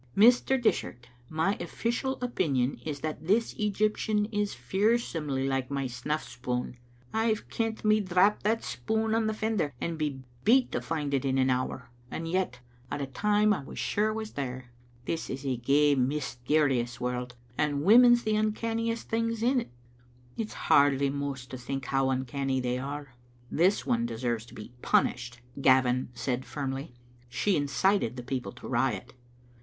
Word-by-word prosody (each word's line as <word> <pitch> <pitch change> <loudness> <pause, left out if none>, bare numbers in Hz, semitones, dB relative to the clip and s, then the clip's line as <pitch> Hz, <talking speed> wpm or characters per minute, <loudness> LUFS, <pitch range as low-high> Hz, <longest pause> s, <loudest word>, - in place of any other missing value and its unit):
Mr. 245 +4 +5
Dishart, 125 - -1 0.2
my 160 +6 +1
official 255 +3 -2
opinion 140 - 0
is 145 -3 -4
that 155 0 -4
this 225 +4 +2
Egyptian 210 0 +1
is 205 -1 -1
fearsomely 170 - 0
like 135 -1 -1
my 140 -1 -1
snuff 130 +5 -3
spoon. 125 0 -3 0.4
I've 220 -1 0
kent 225 -1 -2
me 215 0 +5
drap 195 +1 +3
that 225 +2 +1
spoon 220 0 -1
on 225 -1 +2
the 220 - 0
fen 220 0 -1
der, 145 -6 0
and 165 -1 -3
be 140 -4 -2 0.2
beat 250 +3 +4
to - - -1
find 150 -3 -3
it 135 - +1
in 135 -1 +1
an 130 0 +3
hour. 130 0 -2 0.2
And 165 +4 -4
yet, 165 -8 -1 0.3
a' - - -1
the 140 - -2
time 210 +9 +2
I 185 - -3
was - - -10
sure 210 +1 +1
it 215 - -2
was 220 -1 -4
there. 130 -3 -5 0.3
This 165 - -3
is 135 +2 -5
a 130 -2 0
gey 140 +5 +3
mysterious 130 -1 0
world, 125 0 -3 0.2
and 145 0 0
women's 240 +5 +7
the 215 0 +1
uncanniest 230 +2 -1
things 230 0 -1
in't. 250 0 +2 0.7
It's 220 -1 -4
hardly 140 -1 +4
mous 140 -2 -4
to 130 0 -8
think 135 +1 -4
how 135 0 +1
uncanny 130 +1 -1
they 125 0 -1
are." 140 0 -6 0.4
"This 185 +5 +2
one 115 0 +1
deserves 115 0 -2
to - - -14
be 105 +3 -10
punished," 120 -1 +1 0.2
Gavin 130 -2 +4
said, 125 +1 -2
firmly; 135 -1 -5 0.2
" 120 0 -29
she 205 -3 +3
incited 145 - +1
the 125 - -6
people 125 -5 -3
to - - -10
riot. - - -1
145 Hz, 165 wpm, -29 LUFS, 130-215 Hz, 0.7 s, women's